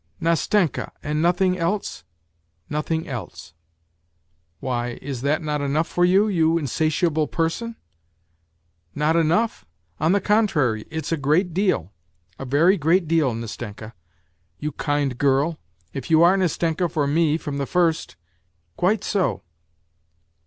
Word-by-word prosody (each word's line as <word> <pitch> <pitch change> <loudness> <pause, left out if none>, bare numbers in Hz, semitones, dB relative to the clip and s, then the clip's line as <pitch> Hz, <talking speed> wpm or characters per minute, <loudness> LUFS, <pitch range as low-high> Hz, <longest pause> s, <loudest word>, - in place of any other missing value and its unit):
" - - -38
Nastenka! 170 - +1
And 150 +1 -1
nothing 180 +2 +2
else? 195 +5 -2 0.3
" 80 0 -46
" 80 0 -44
Nothing 160 +2 -2
else! 110 - -7 1.1
Why, 120 -2 -3
is 135 -3 -5
not 145 +4 0
that 150 -1 -1
enough 145 +3 +1
for 175 - 0
you, 190 +4 +4
you 165 -4 +2
in 160 - -2
satiable 155 +2 +1
person? 180 +8 -2 0.4
" 85 0 -45
" - - -47 0.3
Not 150 +2 +1
enough? 170 +8 +1 0.4
On 160 +2 +2
the 200 - +3
contrary, 165 - +1
it's 160 +1 -4
a 165 - +1
great 155 +6 +1
deal, 175 - 0 0.5
a 135 - -5
very 160 +9 +4
great 165 +2 +2
deal, 160 -5 +2
Nastenka; 110 -1 -7 0.6
you 150 0 -3
kind 145 -3 -1
girl, 140 +4 +2 0.3
if 135 -3 -6
you 160 0 +5
are 175 +3 +6
Nastenka 175 -1 0
for 150 -1 0
me 155 +1 +2
from 145 -3 -5
the 140 - -2
first." 170 - 0 0.3
" 85 0 -45
Quite 200 +3 +1
so 180 - 0
155 Hz, 150 wpm, -23 LUFS, 135-175 Hz, 1.1 s, are